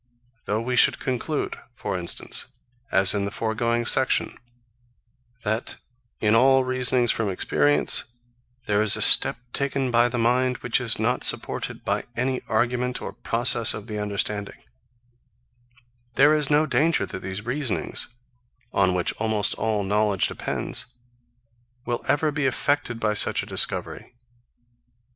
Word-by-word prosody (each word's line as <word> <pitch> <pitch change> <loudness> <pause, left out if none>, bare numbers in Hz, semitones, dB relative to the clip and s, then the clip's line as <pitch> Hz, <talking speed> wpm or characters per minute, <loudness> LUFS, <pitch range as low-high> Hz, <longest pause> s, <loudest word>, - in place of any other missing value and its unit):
Though 105 +2 -1
we 125 +1 -2
should - - +4
conclude, 135 +4 -3 0.2
for 100 -4 -4
instance, 85 -2 -1 0.4
as 95 0 +3
in 100 -1 -1
the - - -3
foregoing 115 +2 -2
section, 130 +1 +1 1.1
that, 110 +3 -2 0.4
in 105 0 +1
all 130 +3 +4
reasonings 130 -1 +1
from 110 -3 -2
experience, 75 -5 +3 0.6
there 105 0 +1
is 110 -2 +5
a - - -5
step - - +7 0.2
taken 135 -2 -1
by 120 +1 +3
the 120 - -3
mind 125 +2 +1
which - - +1
is - - -1
not - - -1
supported - - +1
by - - -1
any 130 +1 -1
argument 125 +3 -1
or - - -7
process 120 -1 +1
of 105 - -8
the 105 -2 -6
understanding; 105 0 -4 1.5
there 145 +3 +5
is 150 -2 0
no 150 +1 +3
danger 160 +2 +1
that - - -7
these 95 +3 -7
reasonings, 130 -1 -1 0.7
on 95 -2 +2
which 90 0 -1
almost 110 -1 +1
all 110 -2 -2
knowledge 105 -1 +1
depends, - - -1 1.0
will 120 0 -3
ever 145 +3 +1
be 145 -2 -1
affected 135 -2 -1
by 105 -1 0
such 105 - +2
a - - -8
discovery. - - -2
115 Hz, 140 wpm, -23 LUFS, 105-130 Hz, 1.5 s, step